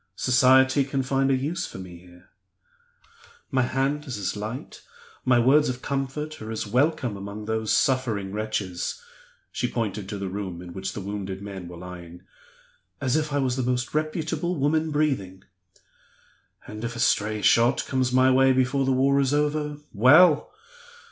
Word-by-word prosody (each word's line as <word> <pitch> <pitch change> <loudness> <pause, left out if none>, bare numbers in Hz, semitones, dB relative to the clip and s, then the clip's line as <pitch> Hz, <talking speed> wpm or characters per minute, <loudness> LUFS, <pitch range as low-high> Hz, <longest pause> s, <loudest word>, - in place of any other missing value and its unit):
Society 130 +3 +4
can 135 0 -2
find 135 +1 +1
a 135 - +3
use 145 +7 -2
for - - -10
me 90 -2 -9
here. 90 +1 -19 1.2
My 130 -2 +2
hand 135 +4 -1
is 125 -5 -4
as 100 0 -3
light, 110 +5 -6 0.4
my 130 -1 +4
words 135 +5 +4
of 125 0 -5
comfort 140 +2 -4
are 110 - -7
as 110 -1 -3
welcome, 125 +1 +1
among 100 +2 -7
those 110 0 -1
suffering 115 -7 +1
wretches" 105 - -3 0.5
(she 125 -2 -2
pointed 105 -4 -3
to 105 - -4
the 100 -1 -4
room 95 -2 -5
in 90 -1 -9
which 95 +1 -5
the 105 - -6
wounded 100 -1 -5
men 95 -3 -7
were 85 0 -10
lying) 90 0 -10 0.8
"as 130 -1 0
if 155 -1 0
I 145 - 0
was 130 -2 0
the - - 0
most 125 0 -1
reputable 160 +2 -2
woman 155 +2 +1
breathing. 130 -12 -1 1.2
And 105 +1 -8
if 115 0 -4
a - - -6
stray 105 -2 +1
shot 115 +6 +4
comes 130 -1 0
my 130 +1 +4
way 130 0 +5
before 130 +1 +1
the 135 - +1
war 135 +2 +3
is 140 +1 +1
over 150 0 -1 0.2
well! 145 - +6
125 Hz, 170 wpm, -25 LUFS, 100-140 Hz, 1.2 s, well